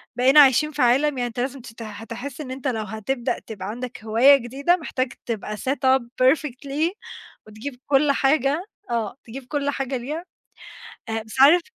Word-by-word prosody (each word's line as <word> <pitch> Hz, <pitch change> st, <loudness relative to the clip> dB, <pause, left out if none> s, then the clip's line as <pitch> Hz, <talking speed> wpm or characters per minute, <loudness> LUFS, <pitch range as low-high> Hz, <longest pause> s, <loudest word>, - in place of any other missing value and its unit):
بقينا 260 Hz, +4 st, +6 dB
عايشين 290 Hz, +2 st, +6 dB
في 295 Hz, -, -3 dB
عالم 250 Hz, +4 st, +4 dB
يعني 245 Hz, -1 st, -1 dB
أنت 240 Hz, 0 st, -7 dB
لازم 260 Hz, +1 st, -3 dB
تت 230 Hz, -1 st, -12 dB
هتحس 230 Hz, +6 st, -7 dB
إن 260 Hz, -4 st, -7 dB
أنت 265 Hz, +1 st, -5 dB
لو 225 Hz, -4 st, -1 dB
هتبدأ 220 Hz, +4 st, -3 dB
تبقى 195 Hz, -4 st, -8 dB
عندك 245 Hz, +1 st, -7 dB
هواية 235 Hz, +6 st, +6 dB
جديدة 275 Hz, +8 st, 0 dB
محتاج 260 Hz, -6 st, -3 dB
تبقى 210 Hz, -2 st, -4 dB
set 265 Hz, +6 st, -2 dB, 0.2 s
up -, -, -11 dB, 0.2 s
perfectly 285 Hz, +3 st, +1 dB, 0.6 s
وتجيب 245 Hz, +5 st, -8 dB
كل 280 Hz, +1 st, +4 dB
حاجة، 275 Hz, +4 st, +1 dB, 0.2 s
آه 235 Hz, -1 st, -2 dB
تجيب 250 Hz, +3 st, -9 dB
كل 285 Hz, 0 st, -1 dB
حاجة 270 Hz, -2 st, -2 dB
ليها، 300 Hz, +8 st, -5 dB, 0.8 s
آآ 225 Hz, 0 st, -2 dB
بس 220 Hz, +4 st, -2 dB
عارف 320 Hz, +6 st, +8 dB
260 Hz, 170 wpm, -23 LUFS, 230-280 Hz, 0.8 s, عارف